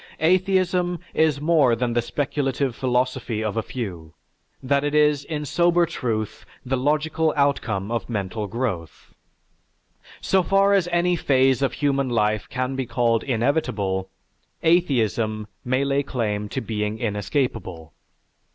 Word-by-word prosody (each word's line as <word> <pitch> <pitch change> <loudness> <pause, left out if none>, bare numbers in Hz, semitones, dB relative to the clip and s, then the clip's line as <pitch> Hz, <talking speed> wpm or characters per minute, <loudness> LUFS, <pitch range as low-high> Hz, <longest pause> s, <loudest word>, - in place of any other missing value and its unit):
"Atheism 180 0 +2 0.2
is 155 -3 +2
more 150 -6 +3
than 120 0 -1
the 120 - +2
speculative 135 0 -1
philosophy 125 -3 -1
of 110 -1 -2
a 115 - +1
few, 90 -10 -6 0.5
that 140 +2 +1
it 145 0 -1
is 150 -1 +3
in 150 -2 -4
sober 175 +3 +3
truth 110 -8 -3 0.2
the 130 +1 0
logical 155 +4 +1
outcome 130 -8 0
of 120 +1 -2
mental 105 -1 -3
growth. 100 -8 -4 1.1
So 190 - +2
far 195 +2 +3
as 190 -3 +3
any 175 +1 +2
phase 130 -5 +2
of 135 -3 +1
human 140 -2 0
life 105 -3 0
can 130 +1 -2
be 130 -2 -3
called 115 -1 +1
inevitable, 110 -7 -1 0.5
atheism 115 - +1 0.2
may 130 +2 0
lay 140 0 +1
claim 105 -6 -2
to - - -3
being 105 -1 -2
inescapable. 105 - -3
130 Hz, 135 wpm, -23 LUFS, 110-150 Hz, 1.1 s, more